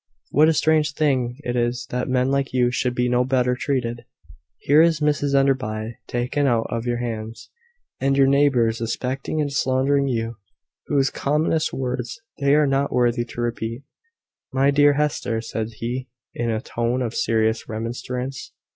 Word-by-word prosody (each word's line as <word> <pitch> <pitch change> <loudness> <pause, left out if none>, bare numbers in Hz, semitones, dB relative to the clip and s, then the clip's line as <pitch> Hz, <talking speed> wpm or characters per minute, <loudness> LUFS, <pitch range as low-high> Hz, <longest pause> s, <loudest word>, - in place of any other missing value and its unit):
"What 155 +3 +5
a - - +3
strange 155 -1 +2
thing 130 -6 +1
it 120 -2 -2
is 120 0 -1
that 125 +1 -2
men 130 +1 +1
like 140 -1 0
you 125 -1 +2
should 125 0 -1
be 125 0 +1
no 125 0 +2
better 125 -1 +1
treated! 125 -3 -2 0.5
Here 150 +3 +4
is 165 -2 +3
Mrs 145 -2 +1
Enderby 120 -5 0
taken 125 +4 0
out 115 -3 +2
of 115 +1 -3
your 120 0 0
hands, 115 -2 -5 0.5
and 135 +1 +1
your 135 - +6
neighbours 135 -5 +3
suspecting 130 +6 -3
and 145 -2 -1
slandering 140 +1 +2
you, 115 -2 -2 0.5
whose 135 -3 +2
commonest 155 +2 0
words 125 - -4 0.2
they 140 0 +3
are 150 0 +4
not 135 0 +1
worthy 120 -1 +1
to 120 - -7
repeat." 115 +1 -3 0.7
"My 135 +1 +3
dear 145 0 +5
Hester!" 140 -6 -1
said 110 -1 -4
he, 125 +4 -4 0.2
in 120 -1 -2
a 110 -1 -1
tone 120 +1 -1
of 115 -2 -3
serious 110 -1 0
remonstrance. 125 +4 -5
125 Hz, 165 wpm, -22 LUFS, 120-140 Hz, 0.7 s, your